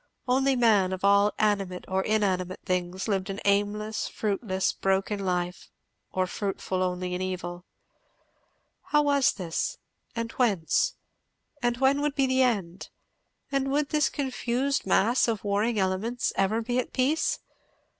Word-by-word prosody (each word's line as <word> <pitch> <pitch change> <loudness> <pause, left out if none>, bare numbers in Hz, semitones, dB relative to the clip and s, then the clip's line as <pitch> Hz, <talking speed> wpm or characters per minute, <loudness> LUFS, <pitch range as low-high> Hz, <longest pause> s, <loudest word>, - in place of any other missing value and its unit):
Only 265 +2 +3
man, 210 -6 +3
of 190 +1 -3
all 200 +1 +5
animate 195 -4 0
or 190 0 0
inanimate 190 -4 0
things, 180 +1 -2
lived 195 -2 -1
an 195 +1 -4
aimless, 205 +2 0
fruitless, 195 -3 -1
broken 195 +1 0
life, 180 -1 -2 0.4
or 185 0 0
fruitful 190 -1 -3
only 180 0 -1
in 180 - -2
evil. 180 -1 -4 1.2
How 295 0 +3
was 285 -2 +3
this? 175 -5 -3 0.4
and 230 0 -3
whence? 220 - +1 0.7
and 240 -1 +1
when 270 +2 +3
would 295 -1 -1
be 275 - +3
the 260 0 +2
end? 195 -8 0 0.6
and 275 -1 0
would 290 +1 +1
this 300 -1 +2
confused 265 -2 -1
mass 230 +7 +3
of 220 -4 -1
warring 210 +3 0
elements 195 +6 0
ever 215 +4 +1
be 245 +2 0
at 255 - -4
peace? 275 +5 +1
205 Hz, 140 wpm, -27 LUFS, 185-250 Hz, 1.2 s, all